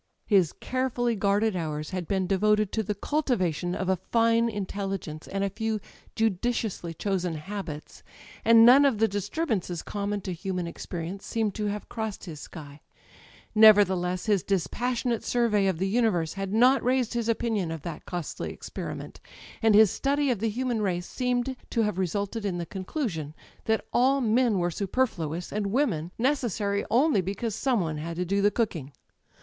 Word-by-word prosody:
His 190 -7 +3
carefully 250 -2 -1
guarded 205 +1 +1
hours 155 -2 -3
had 180 -3 -4
been 190 -2 0
devoted 210 +2 +2
to 220 - 0
the 210 0 -3
cultivation 185 - -1
of 190 - -3
a 190 - +3
fine 230 +4 +2
intelligence 195 -6 -4
and 195 0 -2
a 200 - +1
few 220 +1 -2 0.4
judiciously 220 -3 -1
chosen 180 -2 -1
habits; 155 -2 -7 0.4
and 230 0 +7
none 260 +4 +8
of 270 -6 +3
the 225 +1 +3
disturbances 205 - -2
common 205 0 -3
to 185 - -4
human 180 0 -3
experience 170 +2 -6
seemed 220 -3 -1
to 210 +1 -2
have 205 0 -4
crossed 220 -3 -5
his 160 -5 -8
sky. 145 -1 -10 0.7
Nevertheless, 190 -5 +5
his 205 -4 +2
dispassionate 235 - -1
survey 220 -5 +2
of 190 -4 0
the 190 +3 0
universe 195 -7 +1
liad 195 0 -4
not 250 +6 +4
raised 250 -1 +1
his 235 -1 -1
opinion 225 -6 0
of 160 -2 -5
that 165 -3 -7
costly 175 -4 -4
experiment, - - -7 0.4
and 220 -2 +5
his 215 -2 +7
study 280 0 +1
of 235 - -1
the 225 +2 0
human 240 0 -1
race 180 -3 -1
seemed 250 +2 -1
to 230 - +1
have 210 -3 -1
resulted 200 +4 -2
in 190 -3 -1
the 170 - -3
conclusion 185 - -4 0.3
that 220 -1 +1
all 265 +3 +4
men 235 -2 +2
were 175 -1 0
superfluous, 180 - -2
and 210 -1 -1
women 200 - 0
necessary 225 -6 0
only 260 -3 +3
because 200 +5 -3
some 255 +1 +1
one 160 -4 -2
had 165 +2 -5
to 180 +2 -2
do 200 +3 +1
the 205 - +5
cook 220 -2 -1
ing. 145 -3 -7
205 Hz, 170 wpm, -27 LUFS, 180-230 Hz, 0.7 s, none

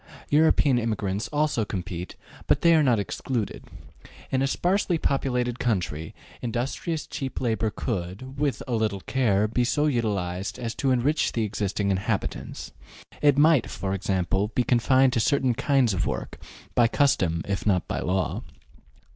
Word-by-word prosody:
European 145 -4 +4
immigrants 105 -3 -2
also 150 -6 0
compete, 90 -3 -5 0.3
but - - +3
they 170 -1 +6
are 160 - +5
not 125 -5 +3
excluded. 110 +2 -3 0.7
In 130 - +1
a 135 - +2
sparsely 180 +4 +1
populated 125 -4 -1
country, 85 -9 -2 0.3
industrious 130 +7 -3
cheap 135 -2 -5
labor 115 -2 0
could, 105 +6 -5
with 145 -2 0
a 125 - -2
little 110 -4 0
care, 110 -5 +1
be 120 +3 0
so 145 +5 +1
utilized 100 -8 -1
as 115 -2 -4
to 135 - -1
enrich 130 +5 +1
the 115 - 0
existing 100 -1 -1
inhabitants; 95 +1 -3 0.5
it 145 -2 +4
might, 150 -3 +4
for 95 -1 -3
example, 95 0 0
be 125 - +3
confined 130 +2 +3
to 120 - +1
certain 130 +2 +2
kinds 130 -2 +2
of 90 - -1
work, - - -4 0.3
by 120 - +4
custom 90 - +1
if 100 +1 -2
not 90 -4 +2
by - - -2
law. 95 +1 -1
120 Hz, 150 wpm, -25 LUFS, 100-135 Hz, 0.7 s, they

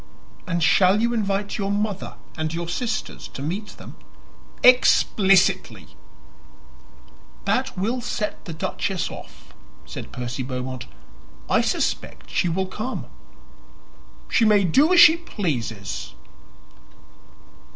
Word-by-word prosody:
"And 170 -2 -1
shall 185 +4 +4
you 235 +2 +1
invite 200 -2 -1
your 200 -1 -1
mother 205 -1 -2 0.2
and 155 -1 -2
your 170 +1 -4
sisters 220 +6 -3
to 135 - -8
meet 195 +8 -5
them?" - - -12 0.7
"Explicitly!" 200 -6 +4 1.6
"That 260 -4 0
will 230 +7 -1
set 210 -2 -4
the 170 - -6
duchess 190 +1 -3
off," - - -12 0.3
said - - -8
Percy 125 +1 -5
Beaumont. 130 -1 -5 0.6
"I - - +4
suspect - - -2
she 175 - +1
will 190 +3 0
come." 215 +7 -5 1.2
"She 235 - +2
may 210 -2 +5
do 275 - +4
as 360 - +6
she 340 -1 +9
pleases." 125 - -4
195 Hz, 110 wpm, -23 LUFS, 165-220 Hz, 1.6 s, she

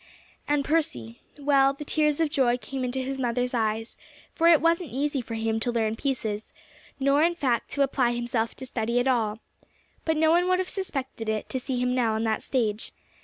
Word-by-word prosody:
And 290 -1 +1
Percy 120 - -1 0.2
well, 275 -1 +3
the 295 +2 -8
tears 300 0 +1
of 320 -3 +1
joy 255 -5 +2
came 265 +1 -5
into 255 +1 -2
his 270 +1 -4
mother's 245 0 0
eyes, 225 -1 -1 0.4
for 335 - +3
it 335 -3 +7
wasn't 335 0 +1
easy 280 +1 -1
for 230 -1 -6
him 225 0 -1
to 240 +2 -1
learn 225 -2 0
pieces, 225 -5 -3 0.5
nor 275 +2 +3
in 340 +2 +3
fact 250 -8 0
to 280 - +3
apply 260 -3 +1
himself 240 -1 -1
to 260 - -8
study 235 -1 -1
at 245 - +1
all. 225 -4 +1 0.6
But 320 -1 0
no 315 0 +4
one 350 +2 +3
would 365 - +4
have 370 0 -2
suspected 270 - -4
it 215 -1 -2
to 260 - -2
see 255 -1 -2
him 250 0 +1
now 235 -3 +1
on 220 - -1
that 220 -1 0
stage. 225 -5 -1
255 Hz, 205 wpm, -26 LUFS, 230-290 Hz, 0.6 s, it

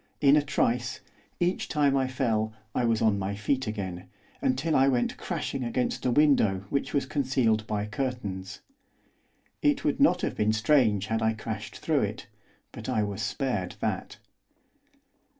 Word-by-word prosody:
In 140 0 +6
a 150 - +5
trice, 125 -3 0 0.4
each 175 +2 0
time 145 -2 +2
I 135 -1 +2
fell, 115 -4 0 0.2
I 125 - +1
was 115 -1 +1
on 105 -3 +3
my 100 +1 -2
feet 125 +5 -1
again, 95 -4 -4 0.4
until 140 +5 +1
I 135 +1 +5
went 125 -3 +1
crashing 130 - -3
against 125 +1 -1
a - - +2
window 120 -9 +3
which 140 - -1
was 140 -2 +1
concealed 130 -6 +1
by 105 -1 -1
curtains. 105 -5 -4 1.0
It 295 -1 +2
would - - +1
not 180 -11 +4
have - - -1
been 105 +1 +2
strange 110 -3 +3
had 110 +1 -1
I 110 0 +2
crashed 110 -1 -6
through - - +1
it, - - -3 0.5
but - - -7
I 110 - +1
was 100 -1 -3
spared 105 -10 -2
that. - - -3
120 Hz, 160 wpm, -28 LUFS, 105-135 Hz, 1.0 s, In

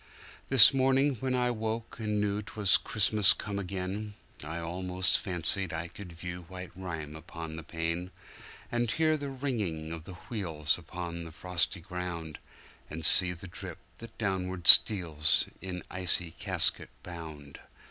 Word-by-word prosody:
This 130 -3 +7
morning 135 +1 +1
when 130 +2 -3
I 125 -1 -1
woke 110 0 -6
and 105 -1 -3
knew 105 0 -2
'twas 105 -2 +1
Christmas 105 -2 +2
come 100 -1 -6
again,I 95 -3 -8
almost 90 +2 -1
fancied 90 0 0
I 85 +1 -6
could 90 -2 -12
view 85 +1 -8
white 90 -1 -10
rime 80 -5 -8
upon 80 0 -10
the 80 - -8
pane, 85 +2 -5 0.6
And 120 -1 -2
hear 155 +6 0
the 145 -2 -6
ringing 105 - -5
of 80 -1 -9
the 95 - -11
wheels 80 -9 -2
upon 85 0 -8
the 80 - -11
frosty 90 +2 -1
ground, 85 -3 -8 0.5
And 80 0 -4
see 90 +2 +10
the 90 +2 -11
drip 85 - -10 0.2
that 115 -1 -14
downward 95 -4 -4
steals 80 -8 +8 0.2
in 90 -1 -7
icy 90 -2 0
casket - - -1
bound. 80 -5 -11
90 Hz, 145 wpm, -28 LUFS, 85-105 Hz, 0.6 s, see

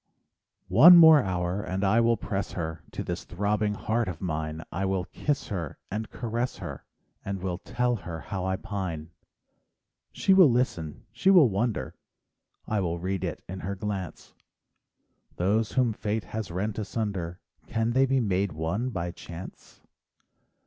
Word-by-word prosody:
One 175 +3 +9
more 160 -3 +9
hour, 90 -1 -1
and 95 -1 -3
I 105 +4 +4
will 115 0 +3
press 100 0 -3
her 80 -3 -4
To - - -3
this 85 -1 -4
throbbing 105 +3 -1
heart 115 +2 -1
of 85 -4 -5
mine; 80 -2 -3
I 90 +5 -2
will 95 -1 0
kiss 145 +7 -2
her 85 -8 -4
and 110 +2 -3
caress 120 0 -3
her, 85 -8 -7 0.4
And 100 -1 -4
will 90 -1 -3
tell 125 +3 -1
her 85 -5 -7
how 95 -2 -4
I 95 0 0
pine. 95 -5 -5 1.0
She 195 - +3
will 185 -6 +8
listen, 100 - -1
she 190 - +1
will 175 -10 +7
wonder, 100 - -1 0.7
—I 110 - 0
will 85 -3 -1
read 95 +2 -3
it - - -4
in 95 +1 -6
her 100 +2 -4
glynce— 95 -2 -5 1.0
Those 105 +5 +1
whom 125 -4 +2
fate 105 +1 -2
has 110 -3 -5
rent 100 +5 -2
asunder 100 -5 -3 0.3
Can 115 +1 0
they 135 +2 +3
be 135 0 +2
made 100 -5 0
one 85 +11 -2
by 90 -6 -3
chance? 85 +1 -11
100 Hz, 155 wpm, -27 LUFS, 90-115 Hz, 1.0 s, One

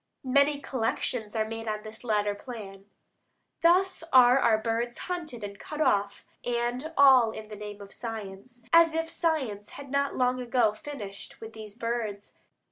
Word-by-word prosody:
Many 280 +2 +3
collections 230 -4 -2
are 220 -1 +1
made 225 0 -6
on 215 -1 -2
this 220 +1 -9
latter 210 -3 +1
plan. 205 -4 -9 0.8
Thus 360 +2 +3
are 250 0 +7
our 220 -4 +4
birds 230 +2 -2
hunted 320 -11 -5
and 200 -1 -7
cut 300 - -7
off 200 -8 +1 0.2
and 245 +5 -2
all 265 -5 +7
in 220 -1 -8
the 210 - -7
name 205 0 -8
of 200 -1 -11
science; 225 +1 -7
as 335 -1 +6
if 325 0 -1
science 270 -12 -1
had 275 -2 -9
not 280 0 0
long 255 0 +1
ago 240 -3 +2
finished 215 -5 -8
with 225 0 -9
these 215 -2 -10
birds. 230 -4 -4
235 Hz, 160 wpm, -28 LUFS, 210-270 Hz, 0.8 s, are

